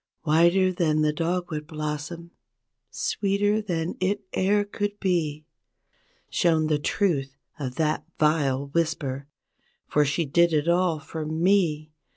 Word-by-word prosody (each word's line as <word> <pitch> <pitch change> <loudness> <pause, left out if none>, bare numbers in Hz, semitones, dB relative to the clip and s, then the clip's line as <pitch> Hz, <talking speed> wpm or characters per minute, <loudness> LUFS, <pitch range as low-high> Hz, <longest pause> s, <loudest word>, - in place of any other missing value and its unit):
V/hiter 170 +4 +4
than 155 -3 +1
the 150 0 +2
dogwood 165 -2 -2
blossom, 155 +2 -5 0.6
sweeter 205 +1 0
than 175 -5 -2
it 200 +2 0
e'er 205 +2 +2
could 205 0 -4
be— 155 -5 -1 0.8
Shown 160 -2 +2
the 155 -1 +1
truth 145 -5 0 0.2
of 130 -3 -4
that 155 0 0 0.2
vile 140 -3 +1
whisper, 140 -4 -2 0.6
for 150 - +2
she 150 +4 0
did 170 +4 +3
it 150 +1 +1
all 175 -1 +2
for 155 +1 -6
me. 160 -1 +1
160 Hz, 125 wpm, -25 LUFS, 150-180 Hz, 0.8 s, V/hiter